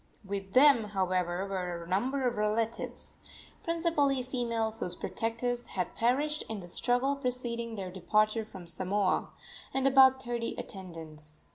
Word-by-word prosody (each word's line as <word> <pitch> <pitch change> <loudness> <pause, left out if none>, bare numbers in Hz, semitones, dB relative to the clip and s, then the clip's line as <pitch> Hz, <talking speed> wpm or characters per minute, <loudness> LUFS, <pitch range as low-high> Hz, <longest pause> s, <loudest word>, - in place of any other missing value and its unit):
With 195 0 -5
them, 265 -4 +7
however, 185 -2 -1
were 180 -3 -3
a - - -12
number 250 +9 0
of 240 - -1
relatives 215 +2 -1 0.4
principally 320 -6 +1
females, 230 -3 -2
whose 180 0 -3
protectors 240 +4 -2
had 180 -2 -1
perished 290 +6 +1
in 220 -2 -4
the 175 -2 -10
struggle 245 +8 +1
preceding 240 -3 -1
their 190 -3 -5
departure 215 +4 +1
from 190 -5 -11
Samoa 185 +2 +1 0.5
and 270 0 +1
about 265 -1 +6
thirty 240 -1 -3
attendants. 160 -5 -9
225 Hz, 135 wpm, -30 LUFS, 190-255 Hz, 0.5 s, them